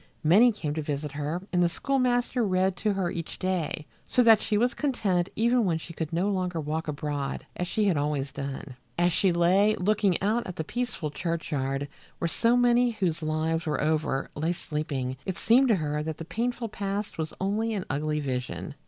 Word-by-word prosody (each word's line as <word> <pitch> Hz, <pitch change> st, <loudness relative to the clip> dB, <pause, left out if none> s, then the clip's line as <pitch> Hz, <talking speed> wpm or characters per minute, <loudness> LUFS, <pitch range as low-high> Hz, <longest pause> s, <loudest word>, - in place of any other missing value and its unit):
Many 205 Hz, +10 st, +6 dB
came 155 Hz, -9 st, -3 dB
to 155 Hz, -, -2 dB
visit 145 Hz, 0 st, -3 dB
her 150 Hz, +5 st, -3 dB
and 180 Hz, -, +3 dB
the 175 Hz, -, +4 dB
schoolmaster 250 Hz, +2 st, +1 dB
read 190 Hz, -2 st, +2 dB
to 210 Hz, +1 st, +1 dB
her 190 Hz, -3 st, -1 dB
each 165 Hz, -2 st, -5 dB
day, 180 Hz, -5 st, -2 dB, 0.2 s
so 250 Hz, -, +3 dB
that 225 Hz, -2 st, +7 dB
she 210 Hz, -, +1 dB
was 245 Hz, +4 st, +2 dB
content 200 Hz, -, 0 dB
even 235 Hz, +2 st, +3 dB
when 175 Hz, -5 st, +1 dB
she 165 Hz, +1 st, -9 dB
could 160 Hz, -1 st, -4 dB
no 175 Hz, +4 st, +1 dB
longer 180 Hz, -3 st, -1 dB
walk 155 Hz, +2 st, -3 dB
abroad 145 Hz, -2 st, -3 dB
as 180 Hz, -, -2 dB
she 215 Hz, -, 0 dB
had 185 Hz, -6 st, +2 dB
always 145 Hz, -2 st, -1 dB
done. 140 Hz, -1 st, -6 dB, 0.2 s
As 175 Hz, +1 st, +3 dB
she 185 Hz, +3 st, +3 dB
lay 185 Hz, +5 st, +4 dB
looking 200 Hz, -1 st, +2 dB
out 220 Hz, +5 st, 0 dB
at 180 Hz, -, -6 dB
the 160 Hz, -, -2 dB
peaceful 220 Hz, -6 st, -3 dB
churchyard, 145 Hz, -4 st, -2 dB, 0.3 s
where 170 Hz, -, -1 dB
so 230 Hz, +8 st, +2 dB
many 245 Hz, 0 st, +4 dB
whose 185 Hz, -7 st, -1 dB
lives 160 Hz, +2 st, -1 dB
were 150 Hz, -, 0 dB
over 155 Hz, -3 st, 0 dB
lay 160 Hz, +4 st, 0 dB
sleeping, 140 Hz, -6 st, -3 dB
it 190 Hz, -, -4 dB
seemed 255 Hz, +4 st, +4 dB
to 225 Hz, -, +4 dB
her 150 Hz, -3 st, -1 dB
that 160 Hz, 0 st, -4 dB
the 165 Hz, -, -7 dB
painful 230 Hz, +6 st, -2 dB
past 200 Hz, -2 st, -4 dB
was 155 Hz, -1 st, -2 dB
only 215 Hz, +4 st, 0 dB
an 190 Hz, -, -3 dB
ugly 150 Hz, +1 st, -1 dB
vision. 130 Hz, +1 st, -3 dB
175 Hz, 195 wpm, -27 LUFS, 150-210 Hz, 0.3 s, that